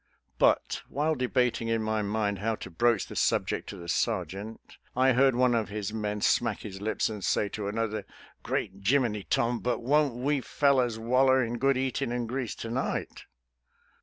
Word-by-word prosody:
But, - - +2
while 150 +3 0
debating 125 -3 0
in 115 -1 0
my 110 0 0
mind 100 -1 -1
how 110 +2 0
to 95 - -9
broach 115 +4 +2
the - - -10
subject - - 0
to 100 - -7
the 85 -1 -9
sergeant, 100 +5 -2 0.4
I 130 +1 +4
heard 135 +1 +4
one 125 0 +3
of 115 -3 0
his 105 0 -4
men 105 -1 -3
smack 115 -1 +1
his 95 -2 -8
lips 110 +1 0
and 105 -3 -6
say 105 - +1
to 105 0 -4
another, 110 0 -2 0.2
" - - -27
Great - - -2
Jiminy, 110 -3 +1
Tom, 120 0 +1
but 120 -1 -2
won't 145 0 +2
we 135 +3 0
fel 140 +1 +2
lers 120 -3 +1
waller 130 +3 +3
in 120 +1 -3
good 135 +1 +3
eatin' 130 -1 -1
an' 120 -1 -1
grease 125 0 -3
to 115 - -6
night! 130 +3 -3
115 Hz, 190 wpm, -28 LUFS, 105-130 Hz, 0.4 s, I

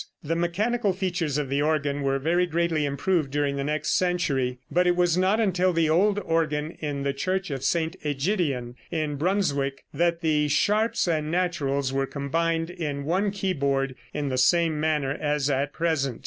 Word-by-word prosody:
The 160 +2 -1
mechanical 200 +5 0
features 175 -6 -1
of 145 -2 -1
the 140 +2 0
organ 145 -2 0
were 135 0 +1
very 170 +6 +1
greatly 165 -2 0
improved 145 +2 0
during 145 0 0
the 140 - -2
next 150 +1 -1
century, 140 -9 0
but 180 +1 +3
it 175 - +3
was 175 -1 +2
not 190 +4 +2
until 185 -4 +2
the 165 -2 +2
old 200 +5 +3
organ 160 -4 0
in 145 -2 -3
the 140 0 0
Church 185 +4 -2
of 135 -2 -4
St. 165 0 0
Ægidien 145 - -1 0.2
in 155 -3 -2
Brunswick 145 -6 0
that 170 0 +1
the 150 -2 +2
sharps 210 +9 +2
and 155 -3 0
naturals 140 -6 0
were 135 0 0
combined 165 +4 -1
in 150 -6 -4
one 190 +6 +1
keyboard 140 -9 -1 0.2
in 145 -1 -2
the 130 -1 0
same 165 +3 +3
manner 150 -3 0
as 150 -1 0
at 140 +2 0
present. 150 -7 -1
155 Hz, 175 wpm, -26 LUFS, 140-175 Hz, 0.2 s, but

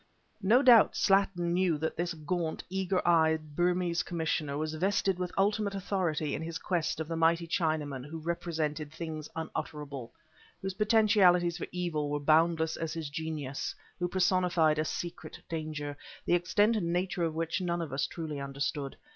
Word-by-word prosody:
No 230 +8 +4
doubt, 240 -5 +7
Slattin 195 -3 +2
knew 180 -3 +2
that 160 +2 -2
this 175 0 -2
gaunt, 160 +1 -2
eager 190 -1 0
eyed 160 -3 +3
Burmese 175 0 +1
commissioner 160 -4 -2
was 155 +1 -2
vested 190 +2 +1
with 180 -1 -2
ultimate 205 0 +1
authority 175 -6 -1
in - - -3
his 165 0 -4
quest 170 -4 -1
of 160 - -3
the 165 - -3
mighty 165 +1 +3
Chinaman 155 -6 -1
who 160 +2 -6
represented 160 -3 -3
things 155 -2 -6
unutterable, 150 -5 -5 0.5
whose 195 0 -4
potentialities 195 -5 +4
for - - -4
evil 170 -5 -2
were 145 0 -1
boundless 160 +2 +3
as 165 -1 -3
his 160 -3 -5
genius, 155 -4 -4 0.2
who 180 - 0
personified 180 -4 +2
a 155 - +1
secret 175 +2 -5
danger, 155 -3 -4 0.3
the - - +2
extent 185 +6 +3
and 170 -6 -1
nature 180 +1 -1
of 160 -1 -1
which 165 +3 -1
none 175 -1 -1
of 160 -5 -4
us 135 0 0
truly 155 -4 -5
understood. 140 +1 -3
165 Hz, 165 wpm, -30 LUFS, 155-180 Hz, 0.5 s, doubt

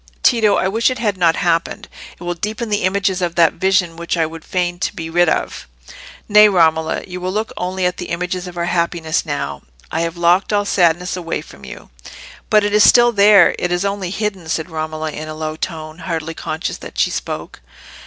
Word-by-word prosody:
"Tito, 225 -4 +4
I - - +1
wish 225 +6 +2
it 255 - -3
had 215 -3 -1
not 170 -3 +3
happened. 165 -1 -1 0.3
It - - -10
will 175 0 -2
deepen 215 +6 -4
the 205 -2 0
images 195 0 0
of 175 -1 -2
that 165 -1 +4
vision 185 -2 +1
which 170 +1 -3
I 165 - +2
would 160 0 -9
fain 175 -1 -2 0.2
be 165 -3 -6
rid 175 0 +3
of." - - -2 0.6
"Nay, 210 0 +7
Romola, 160 -4 +2
you 180 -1 -7
will 185 +1 -2
look 215 +3 -3
only 185 +1 -2
at 180 0 0
the 180 - -6
images 180 +1 -3
of 175 -1 -10
our 170 - -1
happiness 170 -2 -1
now. 70 - -4 0.3
I - - -1
have 165 0 -3
locked 175 +4 +2
all 205 -1 +1
sadness 180 -2 +1
away 170 -4 -3
from 70 - -15
you." 65 - -11 0.6
"But 215 -1 +4
it 205 0 -1
is 210 0 +6
still 240 0 +6
there—it 200 -4 +4
is 175 +2 0
only 200 -2 -2
hidden," 195 -4 -4
said 160 +2 -2
Romola, 155 0 -4
in 155 +1 -7
a 155 - -6
low 155 0 -4
tone, 160 -1 -6
hardly 165 -2 -4
conscious 160 0 -4
that - - -11
she - - +2
spoke. - - -5
175 Hz, 205 wpm, -18 LUFS, 165-195 Hz, 0.6 s, Nay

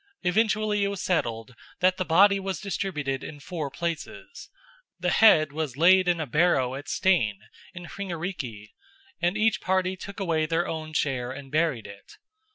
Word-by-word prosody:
Eventually 215 +2 +1
it - - +2
was 200 -1 -4
settled 120 -10 -2 0.3
that 185 +1 +3
the 185 - -2
body 200 +4 +5
was 195 -1 -4
distributed 160 -9 -3
in 145 - -8
four 155 -1 -5
places. 165 +3 -6 0.5
The 180 0 0
head 155 -10 +5
was 150 -4 -4
laid 185 +3 +5
in 175 -1 +2
a 160 - -2
barrow 140 -3 +2
at 145 +2 -7
Steinn 165 - +2 0.4
in 175 0 -8
Hringariki, 165 - -6 0.5
and 175 +4 +1
each 220 0 +2
party 185 0 0
took 200 +3 -9
away 165 -5 0
their 170 +3 0
own 155 -1 -5
share 130 -5 -1
and 135 0 -9
buried 155 -7 0
it. 100 0 -13
170 Hz, 165 wpm, -26 LUFS, 145-190 Hz, 0.5 s, body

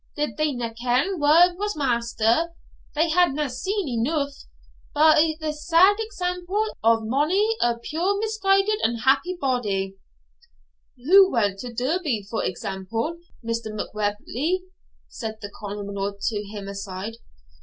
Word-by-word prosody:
did 295 0 -2
they 305 -1 +1
na 240 -3 -4
ken 260 +10 +1
wha 330 +5 +6
was 415 0 -2
master? 240 +3 +1 0.4
had 335 +3 +4
they - - -6
na 300 0 0
seen 375 +9 -2
eneugh, 280 +4 -1 0.6
by 310 +1 +5
the 310 -1 -2
sad 335 +6 +4
example 390 0 -2
of 225 0 +4
mony 330 - +1
a 235 -1 +2
puir 340 +11 -1
misguided 420 -1 +2
unhappy 270 +10 +1
body 205 - -1 0.5
' - - -28
'Who 380 +4 +7
went 205 -5 +1
to 245 +2 -6
Derby, 255 - -1
for 225 - -2
example, 195 - -3 0.3
Mr. 230 0 -2
Macwheeble?' 215 - -2 0.5
said 220 -2 -6
the 205 -2 -8
Colonel 200 -1 -4
to 210 0 -1
him 205 -1 -7
aside. 200 +2 -6
265 Hz, 130 wpm, -24 LUFS, 220-350 Hz, 0.6 s, Who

